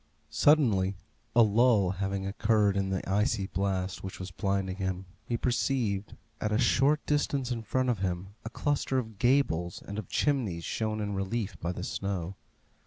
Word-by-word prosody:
Suddenly, 110 -11 +4 0.4
a 120 - +8
lull 110 -3 +4
having 95 0 -2
occurred 105 0 +2
in 95 -1 0
the 95 -1 -2
icy 100 +1 +1
blast 95 -1 -2
which 95 - -6
was 95 -1 -6
blinding 95 0 -1
him, 95 -1 -3 0.2
he 120 - -1
perceived, 115 -5 0 0.2
at 105 - -1
a 105 - +2
short 135 +5 +3
distance 140 -3 0
in 115 -2 -2
front 130 +4 0
of 120 -5 +1
him, 90 0 -2
a 115 - -5
cluster 140 +1 0
of 110 -5 -4
gables 110 -10 +2
and 100 +1 -4
of 100 - -8
chimneys 115 - 0
shown 110 -1 -2
in 105 -1 -2
relief 100 +2 -2
by 85 - -2
the 90 - -6
snow. 100 -2 -3
100 Hz, 170 wpm, -29 LUFS, 95-120 Hz, 0.4 s, a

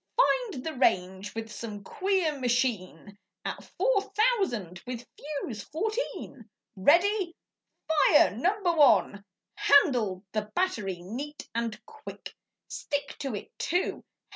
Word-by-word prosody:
Find 480 - +2
the 320 - -2
range 190 -5 +1
with 225 -1 -5
some 210 -2 -7
queer 375 - 0
machine 230 -6 -1 0.3
'At - - -4
four - - +3
thousand 385 - 0
with 245 -1 -5
fuse 280 -7 -5
fourteen. 340 - -4 0.3
Ready! 345 - +3 0.5
Fire 310 -1 +5
number 365 - +1
one!' 210 - +4 0.3
Handled 240 - +3
the 215 -1 -2
battery 205 - -1
neat 275 +10 -6
and 230 -1 -2
quick! 450 -1 -10 0.3
Stick 285 -1 -4
to 270 -6 -3
it, 205 - -7
too! 355 +3 -1
265 Hz, 115 wpm, -28 LUFS, -, 0.5 s, Fire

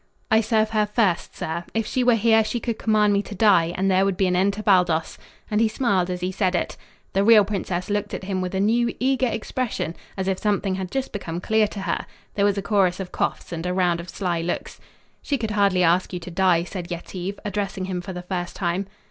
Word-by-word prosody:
"I 220 0 +5
serve 220 0 +1
her 215 -1 +2
first, 205 -5 0
sir. 165 +2 -3
If 225 -1 +1
she 255 +3 0
were 245 -1 +5
here 225 0 +4
she 240 +2 -2
could 230 -1 -3
command 210 -2 +3
me 200 - +2
to 205 - -9
die, 185 -5 +4
and 195 +1 +2
there 190 +1 +4
would 195 -2 0
be 195 - +2
an 180 -1 +1
end 195 +2 +2
to 215 +1 -6
Baldos," 180 -5 +2 0.3
and 210 +1 +2
he 225 - +4
smiled 200 -6 +1
as 180 -1 -3
he 180 +1 -1
said 185 -1 0
it. - - -1 0.4
The 195 - +2
real 215 -1 +7
princess 185 -3 -3
looked 205 0 -1
at - - -7
him 190 -1 -2
with 185 +1 -3
a - - 0
new, 235 +4 +2
eager 260 0 +2
expression, 225 -5 -3 0.2
as 190 0 -2
if 190 -1 0
something 205 -2 0
had 185 -1 -4
just 270 +5 -3
become 175 -5 -4
clear 215 +3 +2
to 200 - -7
her. 185 -3 -2 0.3
There 200 - +2
was 205 0 +2
a 200 - -2
chorus 195 -4 +2
of 190 -2 -5
coughs - - -2
and 165 -1 -4
a 180 - -1
round 175 -2 +2
of 170 +1 -8
sly 175 -2 -2
looks. 175 +1 -4 0.4
"She 280 - -1
could 220 -4 -3
hardly 200 -3 +3
ask 175 +3 +2
you 180 - -2
to 180 - -8
die," 175 -1 +3
said 180 -1 -6
Yetive, 180 +3 -5
addressing 200 -2 -2
him 185 -1 -3
for 190 +2 -7
the 180 -1 -6
first 180 -1 -4
time. 185 +1 -1
195 Hz, 240 wpm, -23 LUFS, 180-215 Hz, 0.4 s, real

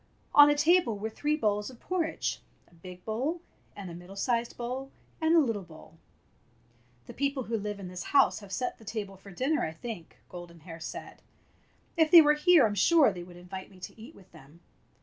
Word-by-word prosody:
On 290 0 +9
a 295 - +3
table 295 - +3
were 220 +2 -4
three 295 +6 -1
bowls 210 -4 0
of 250 -2 -14
porridge 350 -3 -2 0.2
— - - -37
a - - -26
big 180 +2 -12
bowl, 260 +10 -2 0.4
and 190 -3 -8
a - - -8
middle 175 +3 -11
sized 235 +3 -1
bowl, 255 +3 -5 0.3
and 320 +1 +3
a - - +7
little 230 -9 0
bowl. 165 -2 -15 1.1
"The - - -10
people 280 -1 -1
who 230 0 -3
live 205 -1 -4
in 190 - -7
this 180 0 -7
house 275 -1 +3
have 200 -2 -13
set 250 +4 -3
the - - -15
table 205 -2 -5
for 195 +1 -15
dinner, 260 - 0
I 160 - -3
think," 175 -1 -8
Golden 175 -2 -11
Hair 165 0 -10
said. 165 - -8 0.8
"If 320 -1 +4
they 335 0 +10
were 300 0 +5
here 305 -1 +5
I'm 210 - 0
sure 275 - +4
they 180 - -7
would 175 0 -12
invite 185 +2 -9
me 190 - -17
to 200 +4 -10
eat 250 +8 -12
with 190 - -19
them. 145 +5 -17
220 Hz, 210 wpm, -29 LUFS, 180-280 Hz, 1.1 s, they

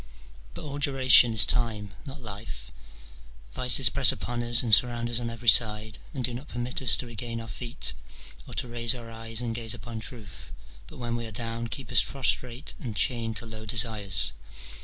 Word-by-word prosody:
But - - -9
all 145 -1 -7
duration 130 -4 +6
is 105 - +9
time, 110 -5 -1
not 135 0 -11
life: 100 - -8 0.8
vices - - +5
press - - +5
upon 120 0 -5
us 120 +1 +2
and 115 -3 0
surround 120 +2 +3
us 120 - -1
on 120 -1 -5
every 115 +1 -9
side, 105 0 +4
and 130 - -6
do 125 - -2
not 130 +5 -9
permit 120 -1 -6
us 115 -6 +2
to 125 - -4
regain 115 0 -7
our 115 - -9
feet, 115 +3 -5 0.5
or - - -10
to - - -3
raise 120 0 +2
our 115 -2 -11
eyes 115 0 -3
and 120 -2 -4
gaze 115 -1 0
upon 115 +3 -9
truth, 110 -4 -10 0.4
but - - -14
when 120 -1 -5
we 115 -1 -6
are - - -9
down 115 +2 -5
keep 135 +3 -7
us - - +5
prostrate 130 0 -2
and 115 -6 -8
chained 115 0 -2
to - - -6
low 110 -1 -9
desires. 105 - +2
115 Hz, 195 wpm, -25 LUFS, 110-120 Hz, 0.8 s, is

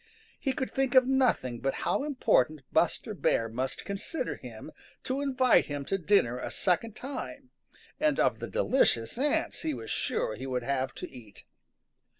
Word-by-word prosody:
He 270 - 0
could 260 - -3
think 270 0 0
of 260 -1 +8
nothing 255 - +2
but 135 +2 -1
how - - +1
important 155 - +2
Buster - - +1
Bear 115 - +1
must 125 +4 -4
consider 200 +11 -3
him - - -10 0.3
to 265 +2 -1
invite 260 -3 +3
him 145 -1 -4
to 195 - -1
dinner 155 - +3
a - - -4
second 200 +4 0
time, 275 0 -7 0.5
and 305 -2 +2
of - - +2
the - - -4
delicious 260 - +2
ants 290 +2 0
he 155 -3 -1
was 115 -2 -7
sure - - -1
he 130 +5 -6
would 125 -2 -2
have 130 -1 -1
to - - -6
eat. 115 -6 -13
195 Hz, 165 wpm, -29 LUFS, -, 0.5 s, of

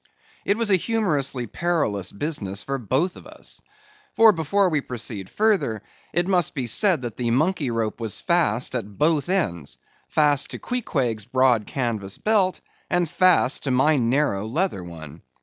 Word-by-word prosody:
It 200 - +1
was 230 -3 +1
a 190 - +6
humorously 155 - -1
perilous 125 - -1
business 100 -7 -3
for 135 0 -3
both 135 - 0
of - - -12
us. - - -8 0.5
For, 225 -1 +7
before 185 +3 +1
we 155 -4 0
proceed 110 -6 -5
further, 185 - +1 0.3
it 175 +1 0
must 180 -4 +1
be 130 -3 -2
said 165 - +2
that 120 -3 -5
the 120 -2 -1
monkey 150 +3 +1
rope 115 -1 -2
was 115 -3 -3
fast 160 - +1
at 105 -5 -4
both 155 +1 +1
ends; 85 - -1 0.3
fast 145 -2 +2
to - - -5
Queequeg's 130 - -2
broad 125 -3 +2
canvas 110 -7 -3
belt, 205 -4 +1 0.3
and 175 -1 +1
fast 170 -6 +3
to - - 0
my 135 +5 +3
narrow 120 -4 +1
leather 150 - -1
one. 80 -2 -8
135 Hz, 160 wpm, -23 LUFS, 115-175 Hz, 0.5 s, For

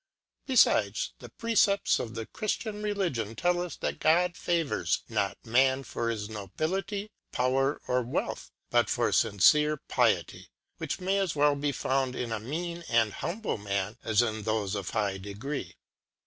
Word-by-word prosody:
Be 265 - -1
fides, - - +4
the - - -10
Precepts 220 -3 +2
of 115 -1 -5
the 115 -1 -4
Chriftian 215 - -3
Religion 170 - -1
tell 175 +7 +1
us 180 -1 -4
that - - -3
God 175 +2 +3
favours 165 -4 0
not 100 - -1
Man 130 +3 +3
for 115 -2 -3
his 105 -3 -3
Nobility, 175 - -3 0.2
Power, 135 +3 +1
or 125 0 +2
Wealth, 120 +1 -3 0.2
but - - +3
for - - +1
fmcere 150 +9 +4
Piety - - +1
^ - - -15 0.3
which - - -3
may 190 +2 +1
as 190 -6 0
well 145 0 +4
be 145 0 -1
found 130 -1 0
in 120 -2 -3
a 110 - -1
mean 170 +8 -4
and 115 -2 +3
humble 195 - -3
Man, 100 0 -2
as 110 +1 +3
in 110 -2 -2
thofe 110 -2 -1
of 100 -3 -3
high 100 -3 -1
degree. 105 +9 -5
135 Hz, 160 wpm, -29 LUFS, 110-175 Hz, 0.3 s, fides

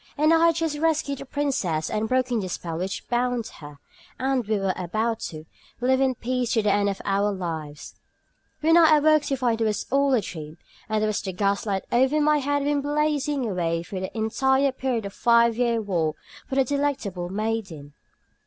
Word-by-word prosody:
and 305 +2 +4
I 330 +1 +5
had 335 - +3
just 320 -3 -2
rescued 305 -3 0
the 275 - -9
princess 225 - -1
and 215 +1 -2
broken 255 -2 +1
the 185 -3 -4
spell 165 -2 -4
which 190 +2 -4
bound 245 -1 0
her, 145 -2 -11 0.4
and 260 0 0
we 215 -1 +1
were 195 -1 0
about 220 +6 -2
to 155 -1 -9 0.3
"live 260 +2 +2
in 260 -1 +2
peace 250 0 -1
to 225 - +2
the 210 - +3
end 205 0 +2
of 195 - -4
our 200 +1 +1
lives," 160 -6 -6 0.7
when 325 +2 +5
I 315 -2 +7
awoke 310 +1 +4
to 275 - 0
find 235 -3 0
it - - +3
was 215 -1 -1
all 275 0 +3
a 230 - +2
dream, 155 -5 -8 0.3
and 215 0 0
that 215 -1 0
the 190 - -3
gas 200 +3 0
light 195 -2 -1
over 265 +5 +3
my 300 0 +3
bed 270 - -5
had 285 0 +1
been 290 0 +1
blazing 290 -2 0
away 170 -4 -1
during 185 +1 -6
the 205 - -9
entire 265 +5 +2
period 255 -4 -2
of 200 - -5
my - - -20
five 235 -1 +4
year 235 -1 +1
war 170 -7 -1 0.3
for 265 - -3
the 270 - +4
delectable 260 -10 -2
maiden. 195 -8 -4
235 Hz, 205 wpm, -25 LUFS, 195-275 Hz, 0.7 s, I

